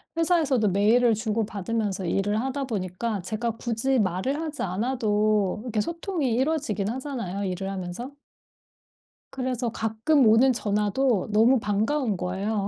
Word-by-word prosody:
회사에서도 310 Hz, -, +2 dB
메일을 225 Hz, +5 st, +4 dB
주고받으면서 210 Hz, -2 st, -2 dB
일을 205 Hz, +4 st, 0 dB
하다 265 Hz, +3 st, -2 dB
보니까 200 Hz, 0 st, -3 dB
제가 220 Hz, +6 st, -2 dB
굳이 245 Hz, +3 st, 0 dB
말을 205 Hz, -, 0 dB
하지 310 Hz, -2 st, -4 dB
않아도 210 Hz, -1 st, 0 dB
이렇게 230 Hz, -4 st, -1 dB
소통이 335 Hz, -, -2 dB
이루어지긴 260 Hz, -8 st, 0 dB
하잖아요 235 Hz, -7 st, -4 dB
일을 190 Hz, 0 st, -3 dB
하면서. 195 Hz, +7 st, -5 dB, 1.2 s
그래서 255 Hz, -2 st, -2 dB
가끔 225 Hz, +6 st, +1 dB
오는 230 Hz, +5 st, +6 dB
전화도 210 Hz, +1 st, 0 dB
너무 230 Hz, +5 st, +5 dB
반가운 215 Hz, +2 st, 0 dB
거예요. 195 Hz, +3 st, -2 dB
220 Hz, 330 characters per minute, -25 LUFS, 200-260 Hz, 1.2 s, 오는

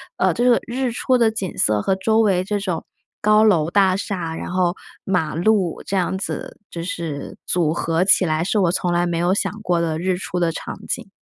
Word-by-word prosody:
呃， -, -, +2 dB
这 245 Hz, +1 st, +2 dB
个 240 Hz, -, +5 dB
日 255 Hz, +1 st, -1 dB
出 255 Hz, +2 st, +1 dB
的 230 Hz, -2 st, +4 dB
景 200 Hz, -5 st, -4 dB
色 105 Hz, -1 st, +2 dB
和 195 Hz, -, +1 dB
周 220 Hz, +3 st, +2 dB
围 185 Hz, -4 st, +2 dB
这 205 Hz, +1 st, -1 dB
种 180 Hz, -5 st, -3 dB, 0.3 s
高 215 Hz, +1 st, +4 dB
楼 170 Hz, -7 st, +3 dB
大 190 Hz, -1 st, +3 dB
厦， 180 Hz, -5 st, -3 dB
然 -, -, -6 dB
后 180 Hz, -1 st, +1 dB, 0.3 s
马 170 Hz, -5 st, -1 dB
路 185 Hz, -1 st, +1 dB
这 195 Hz, -, -1 dB
样 185 Hz, +1 st, 0 dB
子， 195 Hz, -, -5 dB
就 170 Hz, -, -5 dB
是 165 Hz, -4 st, -5 dB
组 165 Hz, -3 st, +1 dB
合 165 Hz, +1 st, 0 dB
起 190 Hz, -1 st, +5 dB
来 155 Hz, 0 st, 0 dB
是 210 Hz, -, 0 dB
我 175 Hz, -3 st, +3 dB
从 175 Hz, -1 st, -1 dB
来 175 Hz, 0 st, +2 dB
没 170 Hz, -1 st, -1 dB
有 175 Hz, +2 st, +2 dB
想 -, -, 0 dB
过 175 Hz, -4 st, +1 dB
的 160 Hz, -1 st, -1 dB
日 185 Hz, +1 st, 0 dB
出 180 Hz, -1 st, -4 dB
的 170 Hz, -1 st, +2 dB
场 -, -, -6 dB
景。 -, -, -4 dB
180 Hz, 235 characters per minute, -21 LUFS, 170-205 Hz, 0.3 s, 个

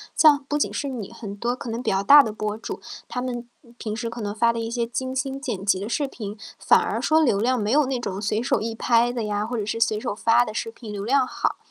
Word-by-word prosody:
像 290 Hz, -3 st, +6 dB
不 295 Hz, -, +1 dB
仅 295 Hz, -, 0 dB
是 285 Hz, -, -2 dB
你， 240 Hz, -7 st, -5 dB
很 210 Hz, -3 st, -7 dB
多 235 Hz, +4 st, -1 dB
可 245 Hz, -, -7 dB
能 230 Hz, +2 st, -4 dB
比 -, -, +1 dB
较 195 Hz, 0 st, +1 dB
大 285 Hz, +8 st, +8 dB
的 220 Hz, -, -3 dB
博 215 Hz, 0 st, -3 dB
主， 225 Hz, -, -6 dB, 0.3 s
他 250 Hz, -, -4 dB
们 245 Hz, -1 st, -4 dB, 0.3 s
平 215 Hz, -2 st, -4 dB
时 230 Hz, +1 st, -3 dB
可 235 Hz, +1 st, -8 dB
能 205 Hz, -2 st, -3 dB
发 230 Hz, +2 st, +3 dB
的 230 Hz, -, -4 dB
一 225 Hz, 0 st, -3 dB
些 235 Hz, -1 st, -1 dB
精 260 Hz, +2 st, -3 dB
心 270 Hz, 0 st, -2 dB
剪 235 Hz, -9 st, -4 dB
辑 195 Hz, -2 st, +2 dB
的 200 Hz, -, -4 dB
视 285 Hz, +5 st, -1 dB
频， 210 Hz, -6 st, -7 dB, 0.2 s
反 -, -, +4 dB
而 -, -, -2 dB
说 315 Hz, +1 st, +3 dB
流 245 Hz, -10 st, +3 dB
量 250 Hz, +3 st, +1 dB
没 210 Hz, 0 st, -1 dB
有 295 Hz, +2 st, +4 dB
那 260 Hz, -1 st, -2 dB
种 195 Hz, -5 st, -4 dB
随 210 Hz, +1 st, 0 dB
手 240 Hz, -, +1 dB
一 225 Hz, +1 st, -2 dB
拍 235 Hz, +1 st, +2 dB
的 235 Hz, -2 st, -2 dB
呀， 210 Hz, 0 st, -1 dB
或 240 Hz, +2 st, -3 dB
者 210 Hz, -, -2 dB
是 215 Hz, +2 st, -3 dB
随 220 Hz, -2 st, +2 dB
手 210 Hz, -, -3 dB
发 230 Hz, +2 st, +4 dB
的 -, -, -6 dB
视 225 Hz, +1 st, -3 dB
频 225 Hz, -2 st, -10 dB
流 200 Hz, -1 st, -5 dB
量 265 Hz, +2 st, +3 dB
好。 -, -, -2 dB
230 Hz, 300 characters per minute, -24 LUFS, 215-255 Hz, 0.3 s, 大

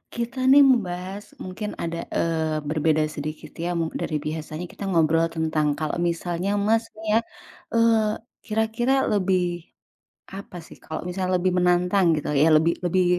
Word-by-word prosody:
Kita, 235 Hz, +2 st, -4 dB
nih, 280 Hz, -, +8 dB
membahas 200 Hz, -7 st, +2 dB, 0.2 s
mungkin 200 Hz, +3 st, -5 dB
ada, 170 Hz, 0 st, -3 dB
eee, 160 Hz, -2 st, 0 dB
berbeda 155 Hz, +1 st, +1 dB, 0.2 s
sedikit, 155 Hz, +1 st, -7 dB
ya, 175 Hz, -, -1 dB, 0.2 s
dari 155 Hz, -2 st, -2 dB
biasanya, 155 Hz, +3 st, -5 dB
kita 200 Hz, -, -10 dB
ngobrol 165 Hz, -1 st, +3 dB
tentang 155 Hz, -2 st, 0 dB
kalau 155 Hz, -1 st, -2 dB
misalnya 175 Hz, +2 st, -1 dB, 0.2 s
Masnya, 220 Hz, 0 st, +1 dB, 0.5 s
eee, 225 Hz, -2 st, +3 dB, 0.2 s
kira-kira 225 Hz, +4 st, +1 dB
lebih 180 Hz, -4 st, 0 dB, 0.6 s
apa, 195 Hz, -2 st, -9 dB
sih, -, -, -13 dB
kalau 160 Hz, -, -5 dB
misalnya 185 Hz, 0 st, -1 dB
lebih 185 Hz, 0 st, +1 dB
menantang 180 Hz, 0 st, +3 dB
gitu, -, -, -7 dB
ya, 155 Hz, +3 st, +5 dB
lebih 160 Hz, +2 st, +4 dB
lebih 180 Hz, +1 st, +2 dB
180 Hz, 135 wpm, -24 LUFS, 160-210 Hz, 0.6 s, nih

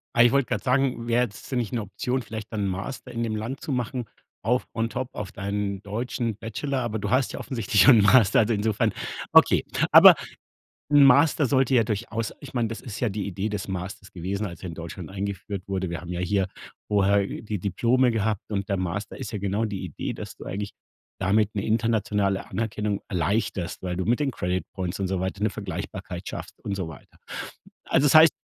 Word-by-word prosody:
Ah, 120 Hz, -, +7 dB
ich 120 Hz, -, +5 dB
wollte 140 Hz, -2 st, +3 dB
grad -, -, -2 dB
sagen, 125 Hz, -2 st, +1 dB
wäre 120 Hz, +1 st, +3 dB
jetzt 120 Hz, +4 st, -6 dB
nicht 120 Hz, -2 st, -1 dB
'ne 115 Hz, -3 st, -1 dB
Option, 125 Hz, +6 st, -2 dB
vielleicht 110 Hz, 0 st, -7 dB
dann 105 Hz, -2 st, -1 dB
Master 105 Hz, +7 st, -5 dB
in 115 Hz, -, -2 dB
dem 110 Hz, -2 st, -1 dB
Land 115 Hz, +6 st, -4 dB
zu -, -, -6 dB
machen 125 Hz, -1 st, -2 dB, 0.4 s
auf 125 Hz, +5 st, +1 dB
on 115 Hz, 0 st, 0 dB
top 130 Hz, +3 st, -3 dB
auf 105 Hz, -3 st, -5 dB
deinen 100 Hz, 0 st, -3 dB
deutschen 115 Hz, +2 st, -2 dB
Bachelor, 130 Hz, +5 st, -3 dB
aber 115 Hz, -2 st, -2 dB
du -, -, -3 dB
hast 130 Hz, +1 st, +2 dB
ja -, -, -5 dB
offensichtlich 110 Hz, -6 st, +1 dB
schon 115 Hz, +2 st, +8 dB
'n -, -, +4 dB
Master, 105 Hz, -1 st, +6 dB
also, 110 Hz, +1 st, +2 dB
insofern 110 Hz, +1 st, +1 dB, 0.4 s
okay. -, -, +6 dB, 0.3 s
Aber -, -, +11 dB, 0.8 s
'n 145 Hz, -1 st, +7 dB
Master 145 Hz, +2 st, +5 dB
sollte 130 Hz, 0 st, +2 dB
ja 115 Hz, -, +6 dB
durchaus 110 Hz, +1 st, -3 dB
ich 140 Hz, -, -10 dB
meine, 120 Hz, -3 st, 0 dB
das 115 Hz, -, -6 dB
ist 110 Hz, -3 st, -7 dB
ja 120 Hz, -, +2 dB
die 100 Hz, -1 st, -3 dB
Idee 100 Hz, +2 st, -2 dB
des 100 Hz, -2 st, -4 dB
Masters 95 Hz, +1 st, -6 dB
gewesen, 95 Hz, +4 st, -3 dB
als 85 Hz, 0 st, -9 dB
er 90 Hz, -, -5 dB
in 85 Hz, -, -6 dB
Deutschland 85 Hz, +1 st, -7 dB
eingeführt 100 Hz, 0 st, -4 dB
wurde. 95 Hz, -2 st, -2 dB
Wir 85 Hz, -1 st, -4 dB
haben 90 Hz, 0 st, -6 dB
ja 90 Hz, -, -3 dB
hier 95 Hz, +1 st, +1 dB, 0.4 s
vorher 100 Hz, -1 st, +3 dB
die 105 Hz, 0 st, -5 dB
Diplome 120 Hz, +7 st, +2 dB
gehabt 110 Hz, -2 st, 0 dB
und 100 Hz, -1 st, -2 dB
der 100 Hz, -, +1 dB
Master 95 Hz, +3 st, -3 dB
ist 125 Hz, -5 st, -6 dB
ja 105 Hz, -, -2 dB
genau 100 Hz, +3 st, 0 dB
die 100 Hz, -3 st, -4 dB
Idee, 80 Hz, -, -4 dB
dass -, -, -8 dB
du -, -, -10 dB
eigentlich 100 Hz, +1 st, -4 dB, 0.5 s
damit 105 Hz, +3 st, +2 dB
'ne 100 Hz, -, -2 dB
internationale 110 Hz, -3 st, +1 dB
Anerkennung 105 Hz, -2 st, -2 dB
erleichterst, 95 Hz, +1 st, -1 dB
weil 90 Hz, -1 st, -3 dB
du 95 Hz, -, -1 dB
mit 120 Hz, +5 st, +1 dB
den 140 Hz, -2 st, +1 dB
Credit 90 Hz, -3 st, -2 dB
Points 95 Hz, 0 st, -3 dB
und 95 Hz, -, 0 dB
so 95 Hz, -1 st, -1 dB
weiter 95 Hz, +2 st, -3 dB
'ne 110 Hz, -, +3 dB
Vergleichbarkeit -, -, -6 dB
schaffst -, -, -7 dB
und 100 Hz, -, -3 dB
so 95 Hz, -4 st, -3 dB
weiter. 70 Hz, -, -13 dB, 0.7 s
Also, 145 Hz, -, +3 dB
das 145 Hz, -, +3 dB
heißt, 160 Hz, -1 st, +9 dB
105 Hz, 210 wpm, -25 LUFS, 95-120 Hz, 0.8 s, Aber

